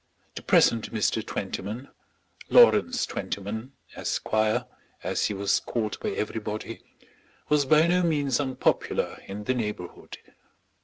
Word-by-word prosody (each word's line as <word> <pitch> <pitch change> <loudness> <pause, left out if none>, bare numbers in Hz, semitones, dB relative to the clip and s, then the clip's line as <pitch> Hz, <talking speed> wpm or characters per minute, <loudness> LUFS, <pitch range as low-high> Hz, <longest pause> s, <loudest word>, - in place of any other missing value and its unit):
The - - -7
present 115 -2 +3
Mr. 110 0 0
Twentyman, 105 +5 -5 0.6
Lawrence 255 - +5
Twentyman, 100 +7 -5 0.2
Esquire, 110 0 0 0.4
as - - 0
he 105 - -1
was 100 0 +1
called 110 -3 -3
by - - -2
everybody, 110 +1 -4 0.7
was 150 -1 +3
by 155 +3 +6
no 180 +1 +3
means 145 -6 +1
unpopular 130 -3 0
in 100 +2 -6
the 130 - 0
neighbourhood. 105 -7 -5
110 Hz, 115 wpm, -26 LUFS, 105-140 Hz, 0.7 s, by